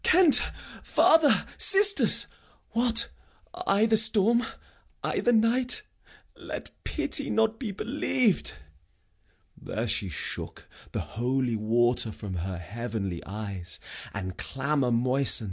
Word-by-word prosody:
Kent! 350 Hz, -5 st, +5 dB, 0.4 s
father! 320 Hz, -2 st, +4 dB
sisters! 400 Hz, 0 st, +5 dB, 0.5 s
What, 235 Hz, 0 st, +1 dB, 0.4 s
i' 290 Hz, -, +1 dB
th' 220 Hz, -1 st, +4 dB
storm? 220 Hz, +1 st, +4 dB, 0.6 s
i' -, -, -1 dB
th' 240 Hz, -, +2 dB
night? 245 Hz, -, +3 dB, 0.5 s
Let -, -, -8 dB
pity -, -, +1 dB
not 225 Hz, 0 st, +1 dB
be 230 Hz, -6 st, -4 dB
believ'd!' 245 Hz, 0 st, -1 dB, 1.0 s
There 115 Hz, +2 st, -5 dB
she 100 Hz, -3 st, -1 dB
shook 75 Hz, -, -6 dB, 0.2 s
The -, -, -3 dB
holy 125 Hz, +1 st, -2 dB
water 115 Hz, +1 st, +1 dB
from 100 Hz, -2 st, -8 dB
her 90 Hz, +1 st, -4 dB
heavenly 105 Hz, -2 st, -5 dB
eyes, 100 Hz, -4 st, -5 dB, 0.3 s
And 95 Hz, -1 st, -6 dB
clamour 140 Hz, -1 st, -1 dB
moisten'd. 125 Hz, +3 st, +3 dB
135 Hz, 110 wpm, -27 LUFS, -, 1.0 s, Kent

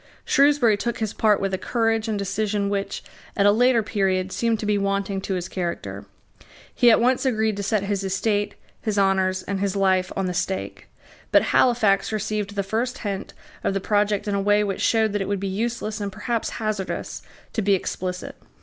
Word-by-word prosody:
Shrewsbury 275 Hz, -6 st, +4 dB
took 235 Hz, +3 st, -2 dB
his 220 Hz, -2 st, -2 dB
part 215 Hz, -2 st, +3 dB
with 195 Hz, -1 st, -2 dB
a 190 Hz, -, -1 dB
courage 225 Hz, -1 st, 0 dB
and 215 Hz, -2 st, -1 dB
decision 200 Hz, +1 st, -1 dB
which, 200 Hz, -1 st, -3 dB, 0.3 s
at 200 Hz, -, +3 dB
a 205 Hz, -, +7 dB
later 240 Hz, +1 st, +3 dB
period, 190 Hz, -3 st, 0 dB
seemed 230 Hz, 0 st, 0 dB
to -, -, -3 dB
be 210 Hz, 0 st, +2 dB
wanting 200 Hz, -1 st, -1 dB
to 190 Hz, 0 st, -2 dB
his 175 Hz, -1 st, -3 dB
character. 175 Hz, -3 st, -4 dB, 0.7 s
He 245 Hz, -, +5 dB
at 225 Hz, -, +6 dB
once 250 Hz, +2 st, +2 dB
agreed 220 Hz, -5 st, +1 dB
to -, -, -2 dB
set 200 Hz, 0 st, 0 dB
his 200 Hz, -1 st, -1 dB
estate, 205 Hz, +2 st, 0 dB, 0.3 s
his 215 Hz, -2 st, -2 dB
honours, 190 Hz, -1 st, +2 dB
and 195 Hz, 0 st, -3 dB
his 200 Hz, 0 st, -1 dB
life, 190 Hz, -2 st, +2 dB
on 195 Hz, -, -1 dB
the 180 Hz, -, -2 dB
stake. 190 Hz, +2 st, -3 dB, 0.4 s
But -, -, +6 dB
Halifax 220 Hz, -6 st, +3 dB
received 210 Hz, -1 st, -2 dB
the 200 Hz, -, 0 dB
first 230 Hz, +5 st, -2 dB
hint 200 Hz, -2 st, -4 dB, 0.3 s
of 195 Hz, -, 0 dB
the -, -, +1 dB
project 205 Hz, +1 st, +1 dB
in 205 Hz, -, 0 dB
a 200 Hz, -, +1 dB
way 205 Hz, +1 st, +3 dB
which 195 Hz, -2 st, -3 dB
showed 220 Hz, -2 st, +2 dB
that 205 Hz, -, 0 dB
it 195 Hz, -, -2 dB
would 200 Hz, -1 st, -1 dB
be 195 Hz, -, -3 dB
useless, 215 Hz, +1 st, -3 dB
and 200 Hz, -1 st, -3 dB
perhaps 220 Hz, +3 st, -2 dB
hazardous, 215 Hz, -3 st, -3 dB, 0.3 s
to 220 Hz, -, 0 dB
be 200 Hz, -1 st, +3 dB
explicit. 180 Hz, 0 st, -4 dB
205 Hz, 200 wpm, -23 LUFS, 195-220 Hz, 0.7 s, a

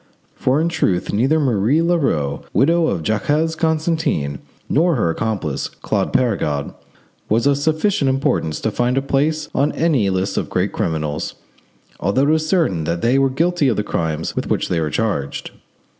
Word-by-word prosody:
For 130 Hz, +3 st, +1 dB
in 165 Hz, -, +1 dB
truth 125 Hz, -, 0 dB
neither 135 Hz, +9 st, +2 dB
Marie 130 Hz, +3 st, +2 dB
Leroux, 135 Hz, -, 0 dB
widow 160 Hz, -, +3 dB
of 85 Hz, -4 st, -1 dB
Jacques 150 Hz, -, 0 dB
Constantin, 160 Hz, -, 0 dB, 0.3 s
nor 165 Hz, +3 st, +2 dB
her 85 Hz, -9 st, +1 dB
accomplice, 95 Hz, -8 st, -2 dB
Claude -, -, -2 dB
Perregaud, 75 Hz, -, 0 dB, 0.6 s
was 115 Hz, +4 st, +2 dB
of 140 Hz, 0 st, +4 dB
sufficient 155 Hz, 0 st, +1 dB
importance 130 Hz, -, 0 dB
to 110 Hz, -, 0 dB
find 125 Hz, +4 st, 0 dB
a 135 Hz, -, +1 dB
place 145 Hz, +3 st, 0 dB
on 140 Hz, +2 st, +2 dB
any 145 Hz, -12 st, +2 dB
list 95 Hz, +1 st, -1 dB
of -, -, -1 dB
great -, -, 0 dB
criminals, 75 Hz, -2 st, -2 dB, 0.6 s
although 130 Hz, -, +2 dB
it -, -, +4 dB
is 155 Hz, 0 st, 0 dB
certain 125 Hz, -, +1 dB
that 85 Hz, +1 st, -2 dB
they 125 Hz, +3 st, +3 dB
were 135 Hz, 0 st, +3 dB
guilty 165 Hz, +2 st, +1 dB
of 120 Hz, -, +1 dB
the 105 Hz, -, 0 dB
crimes 80 Hz, -4 st, -2 dB
with -, -, -3 dB
which -, -, 0 dB
they 85 Hz, -, +1 dB
were 75 Hz, -, -1 dB
charged. 75 Hz, -9 st, -2 dB
130 Hz, 170 wpm, -19 LUFS, -, 0.6 s, of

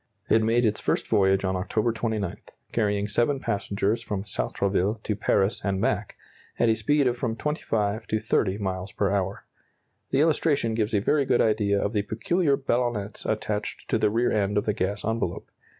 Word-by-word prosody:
It 110 Hz, -, +5 dB
made 115 Hz, +2 st, +2 dB
its 105 Hz, -1 st, +1 dB
first -, -, 0 dB
voyage 95 Hz, 0 st, +3 dB
on 95 Hz, 0 st, 0 dB
October 105 Hz, +5 st, 0 dB
29, 110 Hz, -5 st, -2 dB, 0.4 s
carrying 105 Hz, -2 st, 0 dB
seven 120 Hz, +6 st, +1 dB
passengers 100 Hz, 0 st, -1 dB
from 100 Hz, -2 st, -3 dB
Sartrouville 100 Hz, 0 st, 0 dB
to 105 Hz, -, -1 dB
Paris 100 Hz, 0 st, +1 dB
and 95 Hz, -1 st, 0 dB
back, -, -, -1 dB, 0.4 s
at 120 Hz, -, +3 dB
a -, -, +5 dB
speed 145 Hz, +5 st, +2 dB
of 125 Hz, -1 st, +1 dB
from 115 Hz, -3 st, -1 dB
25 110 Hz, -7 st, -1 dB
to 110 Hz, -, 0 dB
30 105 Hz, -2 st, +1 dB
miles 95 Hz, -1 st, -3 dB
per 100 Hz, -1 st, 0 dB
hour. 100 Hz, 0 st, -2 dB, 0.6 s
The 135 Hz, -, +2 dB
illustration 150 Hz, -6 st, +2 dB
gives 110 Hz, 0 st, 0 dB
a 100 Hz, -, +2 dB
very 140 Hz, +6 st, +2 dB
good 125 Hz, -, +2 dB
idea 105 Hz, -2 st, +2 dB
of 100 Hz, -, -1 dB
the 105 Hz, -, +2 dB
peculiar 140 Hz, -, +1 dB
ballonnets 120 Hz, -6 st, -2 dB
attached 105 Hz, -1 st, -3 dB
to -, -, +2 dB
the -, -, +3 dB
rear 115 Hz, +3 st, +1 dB
end 105 Hz, -1 st, +1 dB
of 105 Hz, -, +1 dB
the 105 Hz, -, +1 dB
gas 100 Hz, 0 st, -2 dB
envelope. 115 Hz, +1 st, -2 dB
105 Hz, 180 wpm, -26 LUFS, 100-120 Hz, 0.6 s, It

